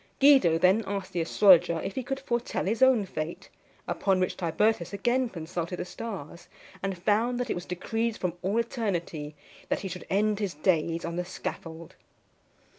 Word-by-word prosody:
Guido 270 Hz, -, +6 dB
then 185 Hz, +6 st, +4 dB
asked 195 Hz, -2 st, -4 dB
the 175 Hz, -, 0 dB
astrologer 175 Hz, -1 st, +5 dB
if 195 Hz, -, -4 dB
he 260 Hz, -, -2 dB
could 270 Hz, +2 st, -4 dB
foretell 240 Hz, -3 st, -2 dB
his 220 Hz, +6 st, -1 dB
own 260 Hz, -6 st, +5 dB
fate; 160 Hz, -2 st, -5 dB, 0.4 s
upon 190 Hz, -2 st, +1 dB
which 185 Hz, -, 0 dB
Tibertus 180 Hz, +2 st, 0 dB
again 240 Hz, +5 st, +1 dB
consulted 170 Hz, -1 st, -4 dB
the -, -, -4 dB
stars, 175 Hz, -5 st, -7 dB, 0.3 s
and 195 Hz, -1 st, -2 dB
found 220 Hz, +7 st, +1 dB
that 245 Hz, -2 st, -2 dB
it -, -, +2 dB
was 175 Hz, +1 st, -6 dB
decreed 225 Hz, +5 st, -2 dB
from 180 Hz, -2 st, -2 dB
all 195 Hz, +4 st, 0 dB
eternity 175 Hz, -, -2 dB, 0.3 s
that -, -, 0 dB
he 195 Hz, -, -4 dB
should 180 Hz, 0 st, -7 dB
end 210 Hz, +1 st, +1 dB
his 200 Hz, -6 st, -2 dB
days 165 Hz, +1 st, +1 dB
on 170 Hz, 0 st, -4 dB
the 180 Hz, -, 0 dB
scaffold. 165 Hz, -2 st, -7 dB
190 Hz, 175 wpm, -28 LUFS, 170-225 Hz, 0.4 s, Guido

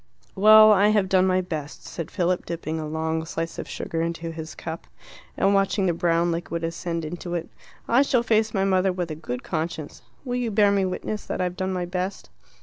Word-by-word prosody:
"Well, 215 Hz, +2 st, +8 dB
I 205 Hz, 0 st, +5 dB
have 210 Hz, -2 st, +3 dB
done 185 Hz, 0 st, +3 dB
my 185 Hz, 0 st, +2 dB
best," 155 Hz, -5 st, -6 dB
said 165 Hz, -, -6 dB
Philip, 180 Hz, -1 st, -1 dB
dipping 160 Hz, -1 st, -3 dB
a 155 Hz, -, -4 dB
long 160 Hz, +1 st, -2 dB
slice 165 Hz, +1 st, -4 dB
of -, -, -6 dB
sugar 165 Hz, -, -3 dB
into 165 Hz, 0 st, -3 dB
his 160 Hz, -1 st, -7 dB
cup, 165 Hz, 0 st, -7 dB, 0.5 s
and 195 Hz, +1 st, +3 dB
watching 195 Hz, 0 st, +2 dB
the 175 Hz, -, +2 dB
brown 170 Hz, 0 st, +1 dB
liquid 170 Hz, 0 st, -3 dB
ascend 165 Hz, 0 st, -3 dB
into 175 Hz, +2 st, -5 dB
it. 170 Hz, -1 st, -4 dB, 0.4 s
"I 240 Hz, +3 st, +4 dB
shall 255 Hz, -4 st, +2 dB
face 220 Hz, -1 st, +2 dB
my 195 Hz, -2 st, +1 dB
mother 190 Hz, 0 st, +2 dB
with 180 Hz, -2 st, -3 dB
a -, -, -4 dB
good 125 Hz, -5 st, -6 dB
conscience. 160 Hz, -2 st, -4 dB, 0.2 s
Will 245 Hz, -1 st, -2 dB
you 245 Hz, -2 st, -1 dB
bear 205 Hz, -1 st, +4 dB
me 200 Hz, -1 st, +2 dB
witness 210 Hz, +3 st, -4 dB
that -, -, -3 dB
I've 180 Hz, -1 st, -1 dB
done 190 Hz, 0 st, -2 dB
my 180 Hz, -1 st, -2 dB
best?" 180 Hz, +2 st, -4 dB
180 Hz, 210 wpm, -24 LUFS, 165-195 Hz, 0.5 s, Well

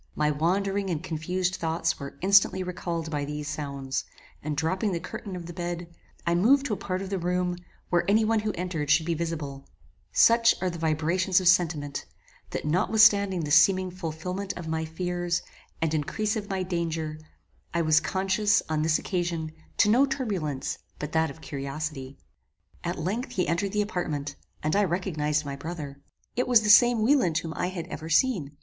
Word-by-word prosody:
My 150 Hz, 0 st, +2 dB
wandering 195 Hz, +6 st, 0 dB
and 165 Hz, -2 st, -2 dB
confused 180 Hz, +2 st, -2 dB
thoughts 165 Hz, 0 st, -1 dB
were 140 Hz, 0 st, -8 dB
instantly 190 Hz, 0 st, +4 dB
recalled 170 Hz, -2 st, -4 dB
by 145 Hz, -2 st, -1 dB
these 150 Hz, +1 st, -5 dB
sounds, 140 Hz, -3 st, -3 dB, 0.4 s
and 150 Hz, 0 st, -3 dB
dropping 185 Hz, +6 st, 0 dB
the 170 Hz, -, -1 dB
curtain 185 Hz, +2 st, -7 dB
of 175 Hz, -2 st, -6 dB
the 175 Hz, -, -8 dB
bed, 175 Hz, 0 st, -5 dB, 0.3 s
I 170 Hz, -, +2 dB
moved 255 Hz, +11 st, +4 dB
to 230 Hz, -, -1 dB
a -, -, -2 dB
part 185 Hz, 0 st, -3 dB
of 195 Hz, -, -7 dB
the 195 Hz, -, -1 dB
room 180 Hz, +1 st, 0 dB, 0.4 s
where 175 Hz, -1 st, +3 dB
any 215 Hz, +2 st, +4 dB
one 225 Hz, 0 st, +2 dB
who 215 Hz, 0 st, -1 dB
entered 170 Hz, -5 st, -3 dB
should 155 Hz, +1 st, +4 dB
be 170 Hz, -, 0 dB
visible; 150 Hz, -4 st, -4 dB, 0.4 s
such 230 Hz, 0 st, +5 dB
are 185 Hz, -1 st, -1 dB
the 170 Hz, -, -7 dB
vibrations 165 Hz, +4 st, +2 dB
of 185 Hz, -, -1 dB
sentiment, 160 Hz, -6 st, +2 dB, 0.4 s
that -, -, -4 dB
notwithstanding 200 Hz, +2 st, +4 dB
the 150 Hz, -2 st, -4 dB
seeming 185 Hz, +4 st, +5 dB
fulfilment 180 Hz, +3 st, -4 dB
of 175 Hz, -2 st, -6 dB
my 160 Hz, 0 st, -1 dB
fears, 175 Hz, +1 st, -2 dB, 0.4 s
and 160 Hz, -1 st, 0 dB
increase 205 Hz, +8 st, -1 dB
of 210 Hz, -2 st, -4 dB
my 190 Hz, -1 st, -1 dB
danger, 165 Hz, -3 st, -3 dB, 0.5 s
I 170 Hz, 0 st, 0 dB
was 155 Hz, 0 st, +5 dB
conscious, 190 Hz, +5 st, +1 dB
on 155 Hz, -1 st, 0 dB
this 155 Hz, 0 st, +3 dB
occasion, 170 Hz, -3 st, -2 dB, 0.3 s
to -, -, +5 dB
no 250 Hz, +6 st, +5 dB
turbulence 195 Hz, -, -2 dB, 0.2 s
but 150 Hz, 0 st, -5 dB
that 160 Hz, -1 st, +2 dB
of 160 Hz, +3 st, -11 dB
curiosity. 140 Hz, -1 st, -5 dB, 0.7 s
At -, -, -2 dB
length 230 Hz, -, -3 dB
he 185 Hz, -6 st, 0 dB
entered 170 Hz, +5 st, 0 dB
the 210 Hz, +1 st, +1 dB
apartment, 150 Hz, -8 st, -3 dB, 0.3 s
and 155 Hz, +3 st, +1 dB
I 205 Hz, -, +4 dB
recognized 155 Hz, -5 st, -1 dB
my 140 Hz, -1 st, -4 dB
brother. 145 Hz, -2 st, -7 dB, 0.3 s
It 250 Hz, -, 0 dB
was 245 Hz, -3 st, +6 dB
the 210 Hz, -, -1 dB
same 240 Hz, +1 st, +7 dB
Wieland 235 Hz, -, +3 dB
whom 165 Hz, -1 st, -3 dB
I -, -, -1 dB
had 180 Hz, -3 st, -5 dB
ever 160 Hz, -2 st, -7 dB
seen. 165 Hz, -, +1 dB
175 Hz, 180 wpm, -27 LUFS, 155-195 Hz, 0.7 s, same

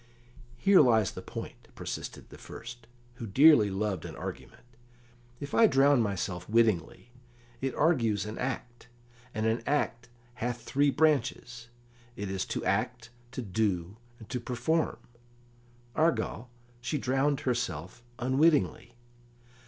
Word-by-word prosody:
"Here 195 Hz, +2 st, +6 dB
lies 110 Hz, -, +4 dB
the -, -, -8 dB
point," -, -, -8 dB
persisted -, -, -6 dB
the -, -, -13 dB
first, 120 Hz, -1 st, -10 dB, 0.3 s
who 115 Hz, -, -6 dB
dearly 130 Hz, 0 st, +6 dB
loved 95 Hz, -3 st, -2 dB
an -, -, -7 dB
argument. -, -, -8 dB, 0.8 s
"If 140 Hz, -1 st, -7 dB
I 230 Hz, -, +6 dB
drown 140 Hz, -, +4 dB
myself 95 Hz, -3 st, -3 dB
wittingly, 110 Hz, -1 st, +1 dB, 0.5 s
it 135 Hz, -1 st, -2 dB
argues 115 Hz, -, +2 dB
an 105 Hz, +1 st, -6 dB
act, 125 Hz, -2 st, -5 dB, 0.4 s
and 110 Hz, -1 st, -2 dB
an 110 Hz, +1 st, +1 dB
act 125 Hz, -4 st, -1 dB, 0.3 s
hath 120 Hz, +1 st, -2 dB
three 140 Hz, +1 st, +2 dB
branches 130 Hz, -5 st, 0 dB, 0.5 s
it 100 Hz, -4 st, -4 dB
is 95 Hz, -1 st, -2 dB
to -, -, -3 dB
act, -, -, -1 dB, 0.2 s
to 130 Hz, -, -4 dB
do, 100 Hz, -2 st, -1 dB, 0.2 s
and 110 Hz, -, -13 dB
to 125 Hz, -, -2 dB
perform; 125 Hz, +7 st, -1 dB, 1.0 s
argal, 155 Hz, -6 st, 0 dB, 0.3 s
she 150 Hz, +5 st, -2 dB
drowned 135 Hz, +2 st, +1 dB
herself 115 Hz, -, -3 dB, 0.2 s
unwittingly." 130 Hz, -1 st, +2 dB
120 Hz, 125 wpm, -29 LUFS, 110-140 Hz, 1.0 s, Here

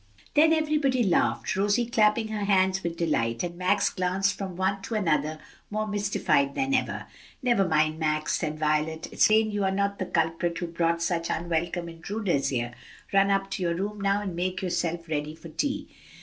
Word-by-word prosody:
Then 310 Hz, +2 st, +5 dB
everybody 300 Hz, -5 st, +2 dB
laughed, 190 Hz, -5 st, +1 dB
Rosie 205 Hz, +5 st, +2 dB
clapping 220 Hz, -2 st, +2 dB
her 210 Hz, -2 st, -2 dB
hands 190 Hz, -1 st, +3 dB
with 170 Hz, -2 st, -4 dB
delight, 115 Hz, -8 st, 0 dB
and 175 Hz, -1 st, -4 dB
Max 185 Hz, +3 st, +1 dB
glanced 190 Hz, +2 st, 0 dB
from 190 Hz, -3 st, -5 dB
one 190 Hz, +2 st, 0 dB
to 225 Hz, -, -4 dB
another 155 Hz, -6 st, +1 dB, 0.3 s
more 215 Hz, +1 st, -1 dB
mystified 205 Hz, -9 st, +1 dB
than 270 Hz, 0 st, 0 dB
ever. 265 Hz, -, 0 dB, 0.4 s
"Never 235 Hz, -7 st, +3 dB
mind, 155 Hz, -1 st, +2 dB
Max," 155 Hz, -1 st, 0 dB
said 155 Hz, -2 st, -2 dB
Violet, 155 Hz, +1 st, 0 dB
"it's -, -, +5 dB
plain 215 Hz, 0 st, +3 dB
you 205 Hz, -1 st, -1 dB
are 190 Hz, -, +2 dB
not 200 Hz, +1 st, -1 dB
the 185 Hz, -, -2 dB
culprit 165 Hz, 0 st, 0 dB
who 175 Hz, -, -2 dB
brought 170 Hz, 0 st, 0 dB
such 170 Hz, -1 st, -1 dB
unwelcome 170 Hz, +1 st, -1 dB
intruders 170 Hz, -2 st, -2 dB
here. 120 Hz, -2 st, -2 dB, 0.4 s
Run 195 Hz, 0 st, +4 dB
up 195 Hz, 0 st, 0 dB
to -, -, -3 dB
your 170 Hz, -1 st, 0 dB
room 205 Hz, +3 st, -4 dB
now 200 Hz, +1 st, +1 dB
and 190 Hz, -4 st, -4 dB
make 185 Hz, +2 st, -2 dB
yourself 170 Hz, -2 st, -2 dB
ready 150 Hz, 0 st, -3 dB
for 165 Hz, -, -11 dB
tea." 275 Hz, -, -2 dB
185 Hz, 185 wpm, -27 LUFS, 165-205 Hz, 0.4 s, Then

